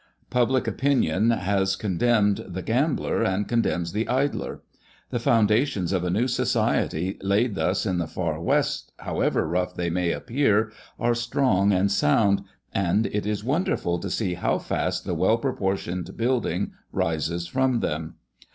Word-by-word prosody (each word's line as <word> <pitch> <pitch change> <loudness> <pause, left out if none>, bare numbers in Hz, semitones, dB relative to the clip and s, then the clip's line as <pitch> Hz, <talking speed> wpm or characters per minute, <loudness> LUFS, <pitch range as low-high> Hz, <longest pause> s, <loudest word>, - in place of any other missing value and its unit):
Public 125 +1 +2
opinion 115 - +1
has 95 -3 +1
condemned 105 +1 +1
the 90 +1 -5
gambler, 135 +5 0
and 100 -2 0
condemns 90 -8 0
the 110 +4 -1
idler. 135 +3 -1 0.5
The 120 - -1
foundations 110 - +2
of 90 -2 0
a 90 - -1
new 110 +8 +1
society 110 -8 0
laid 100 +4 +1
thus 95 +1 0
in 90 -4 0
the 85 - -2
Far 80 -2 -3
West, - - 0
however - - 0
rough 90 +2 -1
they 85 -1 -1
may 90 0 0
appear, 115 -4 +1 0.3
are 120 +2 +2
strong 120 -4 +2
and 95 +1 +2
sound, 100 +3 +3 0.3
and 100 +3 +1
it 105 0 -2
is 105 -1 -2
wonderful 135 - 0
to 100 - -5
see 95 -1 -1
how - - 0
fast - - -2
the - - -2
well - - +3
proportioned 95 -1 -2
building 115 -6 0 0.2
rises 80 +2 -1
from 130 +4 +1
them. 80 +1 -3
100 Hz, 150 wpm, -25 LUFS, 90-120 Hz, 0.5 s, sound